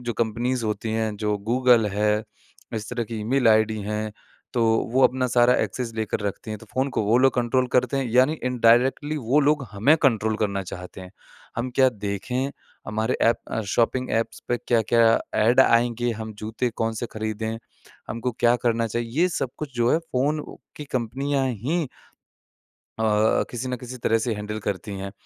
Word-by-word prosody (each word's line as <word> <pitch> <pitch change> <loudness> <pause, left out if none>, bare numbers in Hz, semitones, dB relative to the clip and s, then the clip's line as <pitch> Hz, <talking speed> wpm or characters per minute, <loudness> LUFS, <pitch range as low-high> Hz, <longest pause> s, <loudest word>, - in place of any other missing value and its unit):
जो 120 -1 -3
कंपनीज़ 120 +2 0
होती 110 +1 -2
हैं, 110 -1 -1
जो 105 0 -1
गूगल 125 -3 +4
है, 105 +1 +1 0.5
इस 110 0 -4
तरह 120 -1 -2
की 110 0 -6
ईमेल 120 +2 +2
आईडी 110 0 +3
है, 105 +1 -3 0.4
तो 120 -2 +2 0.3
वो 130 +1 +3
अपना 130 0 +2
सारा 120 +1 +4
एक्सेस 125 -3 -4
लेकर 110 0 -2
रखती 100 +2 -5
हैं। 110 - -4
तो - - -15
फ़ोन 130 +2 +1
को - - +1
वो 110 +4 +3
लोग 135 +1 +4
कंट्रोल 125 +1 +1
करते 130 +2 +2
हैं, 135 - 0
यानी 130 +5 +4
इनडायरेक्टली 125 +5 +3
वो 135 +2 +2
लोग 145 -1 +2
हमें 120 +11 +4
कंट्रोल 110 -5 +2
करना 100 -2 -1
चाहते 90 +1 -9
हैं। 90 0 -10 0.5
हम 120 +2 -2
क्या 130 -1 +6
देखें? 110 +5 -3 0.4
हमारे 110 +3 -1
ऐप 115 - +4 0.2
अ, 110 - 0
शॉपिंग 120 +5 0
ऐप्स 115 0 -1
पे 120 - +2
क्या-क्या 115 0 +4 0.2
ऐड 120 +5 +5
आएँगे? 120 -1 +3
हम 110 0 -6
जूते 110 +3 -2
कौन-से 115 +1 -2
खरीदें? 110 +1 -3 0.5
हमको 115 +2 -3
क्या 120 0 +5
करना 115 -1 +1
चाहिए? 115 +1 -3
ये 180 - +4
सब 135 -7 -2
कुछ 145 -4 -6
जो 120 0 +2
है 160 - +4
फ़ोन 150 -1 -1 0.3
की 150 - -6
कंपनियाँ 135 +3 0
ही 140 - -1 1.1
अ, 110 0 +3
किसी 120 +1 -4
न 125 - -1
किसी 125 +1 -8
तरह 115 - +3
से 115 - 0
हैंडल 105 +1 -5
करती 100 0 -3
हैं। 95 0 -6
115 Hz, 180 wpm, -24 LUFS, 110-125 Hz, 1.1 s, क्या